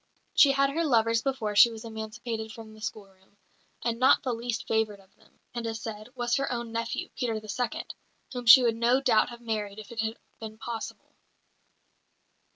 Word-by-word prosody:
She 280 -2 +6
had 275 0 +2
her 330 +4 0
lovers 230 -5 +3
before 230 -6 -2
she 235 - +8
was 225 0 -9
emancipated 220 0 -5
from 220 -1 -11
the 215 - -15
schoolroom; 200 -2 -9 0.5
and 235 -1 -1
not 255 - +5
the 255 - -1
least 235 0 -4
favoured 220 -2 0
of 195 0 -23
them, - - -27
it 235 -1 -3
is 225 0 -4
said, 215 0 -7
was 240 0 0
her 275 -1 -1
own 235 -2 -3
nephew, 230 0 -3
Peter 225 -3 -1
the 215 - -13
Second, 240 +3 -3 0.4
whom 245 -2 -5
she 255 +3 +10
would 230 -2 +2
no 240 +3 +3
doubt 240 -6 +3
have 240 0 -10
married 215 -3 -3
if 215 +2 -10
it 235 - -7
had 220 +1 -3 0.2
been 220 -1 -8
possible. 225 0 -7
230 Hz, 190 wpm, -28 LUFS, 220-240 Hz, 0.5 s, she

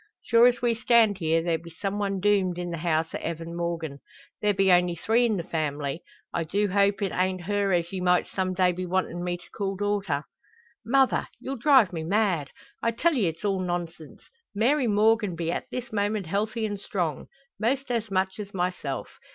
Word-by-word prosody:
Sure 235 +1 +6
as 245 0 0
we 240 -1 +3
stand 225 -3 +3
here 165 -1 +1
there 165 -1 0
be 170 +1 -11
some 195 +5 -4
one 195 -1 -1
doomed 190 -3 +2
in 175 -1 -4
the 170 - -4
house 160 -1 0
o' - - -3
Evan 165 0 -5
Morgan. 170 -4 -3 0.4
There 210 - +3
be 195 -1 +3
only 175 -1 +4
three 230 +8 +2
in 215 -3 0
the 170 - -3
family. 150 -2 -2 0.3
I 170 - 0
do 200 +6 0
hope 200 +1 +2
it 195 - -1
an't 185 0 0
her 200 +1 0
as 170 0 0
ye 185 - -3
might 180 0 +3
some 185 -1 -2
day 180 -1 +3
be 180 +1 -4
wantin' 175 -1 -1
me 175 0 -2
to 175 - -17
call 195 -2 -2
daughter." 200 -7 -1 0.6
"Mother! 265 +3 +2
You'll 270 - -4
drive 255 -6 +5
me 165 - -3
mad! 185 -5 +1 0.3
I 230 - +2
tell 280 +9 +1
ye 230 - +2
it's 165 +5 -4
all 195 -2 +1
nonsense. 175 -3 -5 0.3
Mary 250 +5 +2
Morgan 210 -2 +3
be 165 0 -2
at - - -4
this 250 -3 -6
moment 205 -1 0
healthy 215 +6 -1
and 205 -2 -3
strong 175 -8 -3 0.3
most 255 +4 0
as 230 -2 -1
much 190 +1 -1
as 200 -1 -7
myself. 180 -7 -3
190 Hz, 200 wpm, -26 LUFS, 170-215 Hz, 0.6 s, Sure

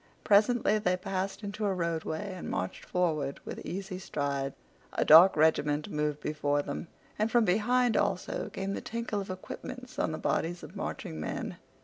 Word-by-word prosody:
Presently 215 +1 +4
they 180 -3 +1
passed 195 +2 -3
into 205 +1 -4
a 195 - 0
roadway 170 +2 -2
and 185 - -6
marched 95 0 -3
forward 155 -6 0
with - - -6
easy 185 0 -5
strides. 140 -6 -2 0.4
A - - +1
dark 170 +5 +9
regiment 150 -1 +2
moved 150 -1 -1
before 145 -1 0
them, 145 +4 -5 0.3
and 215 +1 +2
from 235 0 +4
behind 235 +5 +3
also - - 0
came 195 +1 -3
the - - -3
tinkle 230 -3 -3
of 195 - -8
equipments 250 +7 -7
on - - +1
the 155 - -3
bodies 175 +3 -1
of - - -10
marching 80 - -5
men. 80 - -4
180 Hz, 165 wpm, -30 LUFS, 150-205 Hz, 0.4 s, dark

